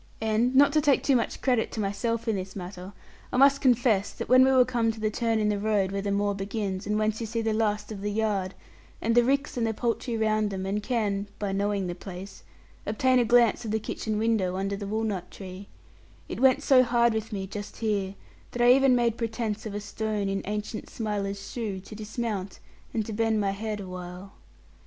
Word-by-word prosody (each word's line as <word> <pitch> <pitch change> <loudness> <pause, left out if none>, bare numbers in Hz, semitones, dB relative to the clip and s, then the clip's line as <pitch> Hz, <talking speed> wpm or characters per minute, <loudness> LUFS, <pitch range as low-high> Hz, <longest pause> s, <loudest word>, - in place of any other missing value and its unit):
And 225 +3 +1
not 280 +1 +6
to 305 - +4
take 285 -2 +3
too 275 - +3
much 235 - -1
credit 250 -4 +1
to - - -4
myself 225 +4 -1
in 220 - +1
this 185 0 -5
matter, 185 0 -7 0.4
I - - -1
must 275 +1 +5
confess 240 -6 +3
that - - -6
when 255 +1 +7
we 265 - +4
were 255 -1 +6
come 235 -3 +1
to 220 - -10
the 215 0 0
turn 230 0 0
in 210 -1 +1
the 205 -1 0
road 205 -2 +1
where 195 0 -2
the 200 0 -2
moor 200 0 +1
begins, 195 -1 -3
and 210 0 +1
whence 215 +1 0
you 225 - -3
see 230 +1 -2
the 220 -1 +1
last 210 -1 0
of 200 -2 -6
the 205 - -2
yard, 205 -3 -1 0.4
and 230 - 0
the 240 +1 +5
ricks 275 +1 0
and 230 -2 +1
the 220 - -2
poultry 235 +1 -1
round 215 -1 +1
them 190 -1 -4
and 200 +2 -1
can 210 -4 -1
(by 205 -2 -2
knowing 200 0 0
the 175 - -3
place) 190 +2 -9 0.5
obtain 255 +4 +3
a 240 - +3
glance 235 0 +4
of 225 - -5
the 220 +1 0
kitchen 215 0 -3
window 215 -5 +1
under 195 +1 -1
the 200 0 -6
walnut 210 -4 -2
tree, 190 0 -9 0.6
it - - -5
went 265 +2 +4
so 265 -3 +6
hard 235 -1 +3
with 220 0 -3
me 195 -2 -3
just 205 +1 -7
here 200 -3 -1 0.4
that 245 - -2
I 245 - +7
even 270 -1 +5
made 235 -2 +1
pretence 220 -2 -3
of 205 - -6
a - - -2
stone 210 0 -3
in 195 0 -1
ancient 210 +1 -4
Smiler's 200 -3 -3
shoe, 215 -6 -3
to 195 - -12
dismount, 215 -2 -4 0.3
and 220 -2 -1
to 220 - -5
bend 225 0 +1
my 200 -1 +1
head 210 +1 -4
awhile. 180 0 -8
215 Hz, 220 wpm, -27 LUFS, 200-230 Hz, 0.6 s, when